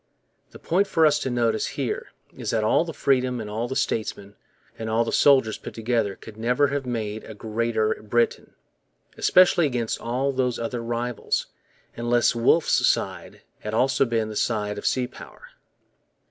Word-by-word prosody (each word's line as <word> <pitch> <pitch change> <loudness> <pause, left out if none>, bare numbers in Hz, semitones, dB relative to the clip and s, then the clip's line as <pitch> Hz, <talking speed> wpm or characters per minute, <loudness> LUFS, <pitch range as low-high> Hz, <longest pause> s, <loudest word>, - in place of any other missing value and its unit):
The - - -13
point 195 +4 +1
for 165 -4 +3
us 150 -1 +4
to 130 - -2
notice 115 -3 0
here - - -2 0.3
is - - -5
that 110 -1 +1
all 110 - +3
the 165 - -5
freedom 130 -4 +1
and 110 - -5
all 110 +3 -3
the 130 - -5
statesmen 100 -4 -2 0.5
and 110 0 -4
all 115 +1 +2
the 115 - -3
soldiers 130 -6 +4
put - - -9
together 115 -3 0
could 110 -1 -13
never 125 +5 +2
have 140 -2 -3
made 110 -3 -3
a 110 - -10
Greater 110 0 0
Britain, 115 +2 -1 0.6
especially 180 -3 +4
against 120 -4 -2
all 130 +4 -1
those 125 -2 0
other 115 +1 -3
rivals, 120 0 -2 0.5
unless 120 0 +2
Wolfe's 120 +8 +3
side - - -2 0.2
had 105 +1 -4
also 130 +3 +3
been 115 -3 -1
the 110 - -7
side 105 -2 -1
of - - -3
sea 130 -1 +1
power. 125 - -13
120 Hz, 170 wpm, -24 LUFS, 110-130 Hz, 0.6 s, us